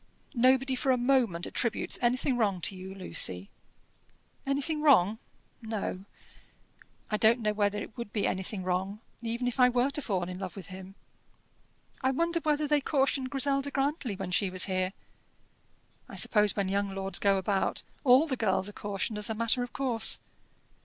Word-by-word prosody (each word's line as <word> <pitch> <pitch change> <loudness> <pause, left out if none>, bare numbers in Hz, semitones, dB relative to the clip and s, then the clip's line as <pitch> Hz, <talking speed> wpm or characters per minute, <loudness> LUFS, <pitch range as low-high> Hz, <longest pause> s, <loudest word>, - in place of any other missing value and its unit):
"Nobody 260 +1 +3
for 260 +1 +1
a 255 - +3
moment 240 -9 +1
attributes 235 -3 -1
anything 250 +2 +1
wrong 205 -6 +1
to 195 - -1
you, 190 +1 -9
Lucy." 95 - -1 1.0
"Anything 285 +3 -1
wrong 225 - +4 0.4
no. 210 -4 -4 1.1
I 215 - +1
don't 225 +3 +4
know 210 -1 0
whether 205 -1 0
it - - -12
would 235 -4 -7
be 210 -2 -1
anything 190 +1 -3
wrong, 185 +3 -2 0.2
even 235 +2 -2
if 245 +2 -3
I 250 0 +7
were 250 +2 +1
to 295 - -1
fall 190 -9 -1
in 180 +1 -6
love 190 -2 -6
with 195 -4 -8
him. 190 +1 -10 1.1
I 260 - +2
wonder 335 +5 0
whether 300 -1 0
they 295 0 +3
cautioned 270 -2 0
Griselda 275 0 +1
Grantly 275 -5 -1
when 180 - -5
she 195 +2 +2
was 185 0 +2
here? 185 -1 -1 1.2
I - - -9
suppose 210 -2 +3
when 200 -2 -1
young 200 +1 0
lords 195 -1 -1
go 200 -1 +3
about, 195 +1 0 0.2
all 260 +2 +6
the 280 -5 -2
girls 190 -4 0
are 205 - -8
cautioned 205 +1 -3
as 210 - +1
a 220 - -2
matter 230 +3 +1
of 245 -1 -4
course. 240 -5 +2
225 Hz, 175 wpm, -29 LUFS, 195-265 Hz, 1.2 s, I